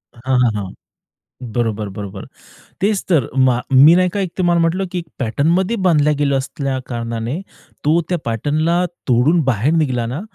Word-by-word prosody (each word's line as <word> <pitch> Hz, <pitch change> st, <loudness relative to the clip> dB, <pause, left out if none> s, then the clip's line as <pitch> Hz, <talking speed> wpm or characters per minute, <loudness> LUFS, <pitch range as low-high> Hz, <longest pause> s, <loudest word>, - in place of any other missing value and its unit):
हां, 130 Hz, +2 st, -1 dB
हां, 120 Hz, -, +3 dB
हां. 100 Hz, -2 st, -4 dB, 0.9 s
बरोबर, 110 Hz, -3 st, -1 dB
बरोबर. 100 Hz, -1 st, -7 dB, 0.6 s
तेच 200 Hz, 0 st, +1 dB
तर. 155 Hz, -10 st, +2 dB, 0.2 s
मा 125 Hz, -1 st, +1 dB
मी 145 Hz, +6 st, +8 dB
नाही 180 Hz, 0 st, +3 dB
का 200 Hz, -, -4 dB
एक 185 Hz, -3 st, -2 dB
तुम्हाला 175 Hz, -2 st, +2 dB
म्हटलं, 180 Hz, +4 st, 0 dB
की 180 Hz, -, -2 dB
एक 170 Hz, -, -8 dB
पॅटर्नमध्ये 165 Hz, -, +1 dB
बांधल्या 150 Hz, -3 st, +3 dB
गेल्या 140 Hz, -2 st, +2 dB
असल्या 135 Hz, 0 st, -3 dB
कारणाने, 115 Hz, +3 st, -4 dB, 0.5 s
तो 160 Hz, +3 st, +4 dB
त्या 180 Hz, -, +1 dB
पॅटर्नला 155 Hz, +9 st, 0 dB, 0.2 s
तोडून 130 Hz, +7 st, +3 dB
बाहेर 130 Hz, +3 st, +1 dB
निघला 130 Hz, -7 st, 0 dB
ना, 130 Hz, +8 st, -4 dB
140 Hz, 160 wpm, -18 LUFS, 120-170 Hz, 0.9 s, मी